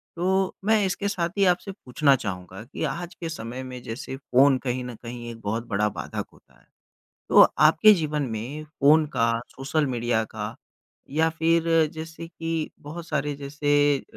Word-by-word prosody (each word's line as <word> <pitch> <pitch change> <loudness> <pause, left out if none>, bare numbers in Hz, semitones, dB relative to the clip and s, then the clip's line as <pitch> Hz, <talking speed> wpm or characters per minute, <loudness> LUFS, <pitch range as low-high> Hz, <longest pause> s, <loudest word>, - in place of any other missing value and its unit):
तो 190 +2 +1
मैं 220 -1 +4
इसके 200 +2 -1
साथ 175 -4 -1
ही 200 - +4
आपसे 180 +2 +1
पूछना 140 -5 +2
चाहूँगा 95 -2 -6
कि 120 - -7
आज 170 +4 -4
के 165 - -5
समय 125 -4 -6
में 125 -1 -8
जैसे 125 +3 -6
फ़ोन 135 0 +4
कहीं 125 -1 -2
न 125 -1 -7
कहीं 120 0 -7
एक 115 - -10
बहुत 115 +3 -2
बड़ा 105 0 +1
बाधक - - -5
होता - - -24
है। - - -28 0.6
तो - - +8
आपके 160 +8 +6
जीवन 150 -4 -1
में 125 +8 -5
फ़ोन 155 +1 +4
का, 115 -5 +1 0.2
सोशल 140 +4 0
मीडिया 120 -2 0
का 110 0 -6 0.5
या 160 +3 +2
फिर 165 +1 +2 0.3
जैसे 160 +1 -7
कि 165 -1 -3
बहुत 165 +3 -8
सारे 150 -2 -1
जैसे 145 0 +1
अ, - - -10
145 Hz, 175 wpm, -25 LUFS, 120-165 Hz, 0.6 s, तो